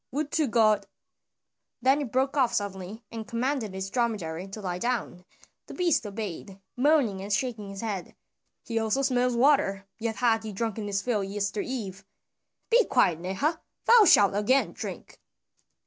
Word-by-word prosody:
"Would 295 +3 -2
to 310 -3 +1
God" 220 -3 +3 0.9
then 265 +4 +3
he - - -1
broke 265 +3 0
off 260 -4 +2
suddenly 200 +2 -4
and 225 -1 -6
commanded 235 -3 -2
his 190 0 -4
dromedary 195 -8 -2
to 195 +3 -8
lie 180 -3 -4
down; 235 -6 -2 0.4
the - - -9
beast 340 -11 +1
obeyed, 200 -2 -6 0.2
moaning 255 -8 +2
and 200 +2 -6
shaking 215 -2 -1
his 195 0 -7
head. 205 -5 -4 0.5
"He 230 -1 -1
also 225 +5 0
smells 250 -2 +1
water, 235 -7 +3
yet 225 -1 -2
hath 225 0 +2
he 215 -1 -7
drunken 220 0 -3
his 200 -1 -1
fill 220 -5 0
yester 200 +1 -2
eve. 205 -7 -5 0.7
Be 480 +1 +6
quiet, 215 - +2
Neha! 195 - -1 0.2
thou 465 -2 +7
shalt 200 - +6
again 210 +7 +2
drink. - - -8
220 Hz, 160 wpm, -27 LUFS, 195-255 Hz, 0.9 s, thou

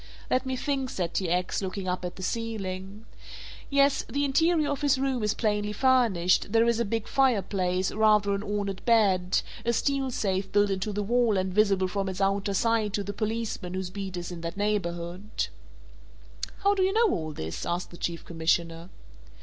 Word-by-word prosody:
"Let 260 +1 +1
me 260 - -1
think," 270 0 -1
said 175 -6 -3
T. 185 -3 -1
X., 180 +3 0
looking 190 0 -4
up 180 0 -2
at 175 -1 -4
the 185 - -8
ceiling. 200 -1 -4 0.6
"Yes, 280 -1 +3
the 285 +1 0
interior 310 +2 +2
of 285 - -3
his 285 -2 +3
room 265 -2 0
is 210 0 0
plainly 210 -1 0
furnished, 215 -8 +3
there 225 0 +5
is 235 -1 +2
a 235 - +1
big 225 +1 -2
fireplace, 195 -8 +1
rather 210 -2 +3
an 200 - -1
ornate 205 -2 -3
bed, 195 -6 +3 0.2
a 235 - +2
steel 270 +3 0
safe 195 -5 -1
built 205 0 +3
into 195 +2 -2
the 205 0 -2
wall 235 -1 +2
and 185 0 -1
visible 195 -2 +3
from 195 +1 -2
its 190 - -5
outer 195 0 +1
side 225 -1 +1
to 205 - -1
the 200 +1 -5
policeman 215 -4 -3
whose 185 -1 -3
beat 195 -2 -5
is 175 0 -5
in 170 -1 -7
that 170 +2 -5
neighborhood." 175 - -2 1.1
"How 400 0 +5
do 390 - 0
you 380 +1 +2
know 450 -2 +4
all 155 -2 -2
this?" 80 - -5
asked 175 +1 -3
the - - -10
Chief 170 -1 -4
Commissioner. 165 +1 -1
205 Hz, 190 wpm, -27 LUFS, 185-235 Hz, 1.1 s, there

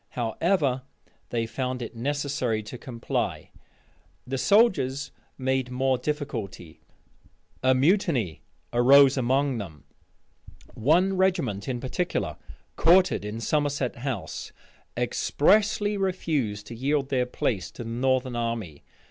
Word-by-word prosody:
However, 130 - +1 0.5
they 115 -1 -1
found 125 +1 -3
it 115 - -8
necessary 135 -3 -1
to 105 +4 -8
comply. 120 -3 -3 0.7
The 130 +1 -3
soldiers 145 - +3 0.3
made 130 -1 0
more 130 0 +1
difficulty. 115 - -5 0.8
A 130 0 +4
mutiny 140 - +1 0.3
arose 135 +3 +6
among 130 0 +1
them. 80 -8 -8 0.9
One 175 - +2
regiment 170 - 0
in 125 -2 -2
particular, 140 +8 -2 0.4
quartered 180 - +4
in 105 +2 -5
Somerset 145 0 -1
House, 120 -5 -5 0.5
expressly 205 +4 +2
refused 150 - -1
to 115 - -8
yield 135 +3 0
their 125 -2 +1
place 100 -7 -2
to - - -8
the 115 - -7
northern 130 +1 0
army. 115 -10 -3
130 Hz, 110 wpm, -26 LUFS, 115-145 Hz, 0.9 s, arose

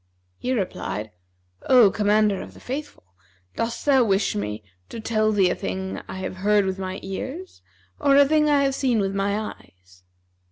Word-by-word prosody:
He 255 - -2
replied, 180 - -3 0.6
"O 245 -6 +7
Commander 210 -1 +2
of - - -10
the - - -13
Faithful, 280 - -6 0.5
dost 230 0 -3
thou 270 -3 +5
wish 200 -2 +1
me 105 +1 -4 0.3
to 230 - -7
tell 215 -1 +1
thee 195 -4 +3
a - - +1
thing 190 0 -4
I - - -7
have 185 0 -5
heard 205 +1 +2
with 190 0 -3
my 185 0 -4
ears 270 - -6 0.4
or 280 -1 +4
a 285 - +7
thing 300 0 +3
I 285 -1 +4
have 275 -1 +1
seen 260 -3 +1
with 195 -2 0
my 200 +1 0
eyes?" 90 0 -24
210 Hz, 175 wpm, -24 LUFS, 190-260 Hz, 0.6 s, O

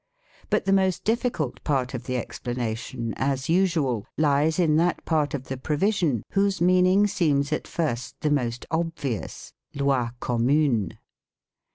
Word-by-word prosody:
But - - +1
the 195 - +3
most 190 -2 +2
difficult 225 - -1
part 130 -3 0
of 125 - -5
the 125 -1 -1
explanation 120 -1 -4
as 135 0 -1
usual 160 - +1
lies 150 +1 +2
in 165 -4 +3
that 175 +2 +1
part 150 -3 +1
of 135 - -5
the 130 0 -5
provision 150 - 0
whose 200 0 +1
meaning 185 +3 +4
seems 150 -7 +1
at - - -3
first 120 -8 -2
the 150 -1 +1
most 125 -4 -1
obvious 160 - -3 0.2
"lay 140 -3 +1
commune". 120 - +1
145 Hz, 140 wpm, -25 LUFS, 125-170 Hz, 0.2 s, meaning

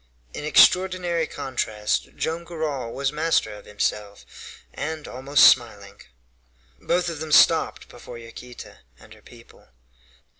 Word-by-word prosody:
In - - -7
extraordinary 180 +1 +3
contrast, 110 -6 -3
Joam 165 +1 -3
Garral 155 -8 -5
was 135 +1 -2
master 155 -5 0
of 105 - -13
himself, 105 0 -4 0.5
and 160 0 -6
almost 135 +3 +1
smiling. 100 -5 +3 0.8
Both 180 0 0
of 165 -3 -5
them 155 0 -6
stopped - - +3
before 120 - -12
Yaquita 115 +1 -12 0.2
and - - -17
her - - -19
people. - - -18
140 Hz, 120 wpm, -23 LUFS, 115-160 Hz, 0.8 s, extraordinary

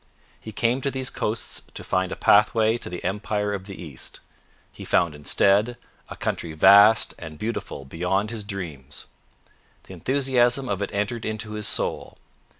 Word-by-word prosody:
He 110 - -9
came 120 +5 0
to 140 - 0
these 130 -1 -2
coasts 110 +2 -3
to - - -7
find 95 0 -1
a - - -3
pathway 110 +2 +4
to 120 - -6
the 90 0 -7
empire 105 +1 -2
of 95 -2 -5
the 100 - -9
East. 75 -7 -9 0.5
He - - -10
found 85 -3 +2
instead 100 +10 +2 0.3
a - - -7
country 80 - -3
vast 100 +6 +6
and 80 -2 -9
beautiful 105 -9 -5
beyond 90 - -1
his 110 -3 -4
dreams. 80 -9 -7 0.8
The - - -12
enthusiasm 130 -1 +1
of 100 -1 -2
it 100 - -2
entered 105 +3 -2
into 110 0 -4
his 105 -1 -1
soul. - - -1
105 Hz, 160 wpm, -24 LUFS, 95-115 Hz, 0.8 s, vast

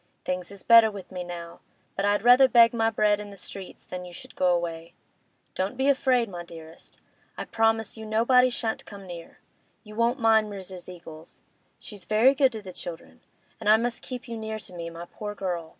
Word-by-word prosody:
Things 180 -1 -3
is 200 -1 -10
better 230 -1 +7
with 200 -3 -10
me 180 -1 -5
now, 170 -1 -8 0.4
but 195 - -1
I'd 205 0 +1
rather 250 +2 +7
beg 235 -2 +6
my 225 -1 +2
bread 210 -2 +2
in 205 0 -8
the 200 - -12
streets 195 0 -9
than 180 0 -7
you 180 - -10
should 175 - -11
go 185 - +1
away. 170 -2 -1 0.6
Don't 195 +6 -3
be 265 +2 +2
afraid, 260 -3 +2
my 175 -3 -7
dearest. 165 -1 -13 0.4
I - - -4
promise 225 -1 0
you 220 0 -8
nobody 250 +4 +4
shan't 225 -2 -3
come 200 -2 -10
near. 175 -2 -10 0.5
You 210 -1 -12
won't 235 +4 +1
mind 220 -2 +3
Mrs. 185 -2 -8
Eagles; 165 -3 -11 0.3
she's 205 -5 -10
very 225 +5 +4
good 270 -1 +3
to 220 -2 -7
the 185 -2 -9
children. 170 -2 -9 0.4
But 220 - -6
I 215 +1 +7
must 235 +1 -2
keep 250 -1 -7
you 230 -1 -5
near 220 0 -4
to 200 - -8
me, 170 -1 -6
my 170 +1 -9
poor 210 +3 -7
girl! 175 -5 -4
205 Hz, 205 wpm, -26 LUFS, 180-230 Hz, 0.6 s, better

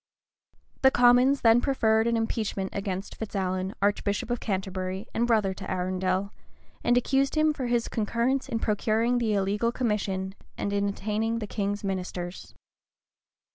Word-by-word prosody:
The 265 - +7
commons 250 +2 +5
then 230 +1 +5
preferred 225 -5 +2
an 235 0 +2
impeachment 215 -4 -2
against 195 -1 -4
Fitz 220 -1 -6
Alan, 185 0 -1
archbishop 205 +2 0
of 240 - 0
Canterbury, 190 -1 -3
and 235 +1 +1
brother 215 -5 +2
to - - -8
Arundel, 185 +1 -1 0.5
and 240 0 +3
accused 270 +3 +1
him 310 0 +3
for 265 -4 -3
his 240 -1 +1
concurrence 235 +5 -1
in 230 - -1
procuring 225 +2 +1
the 220 -3 +1
illegal 205 +4 +1
commission, 200 -6 -1 0.2
and 200 - -2
in 200 0 +1
attainting 215 +3 -1
the 225 - -3
king's 205 0 -3
ministers. 180 -2 -5
210 Hz, 145 wpm, -27 LUFS, 195-235 Hz, 0.5 s, The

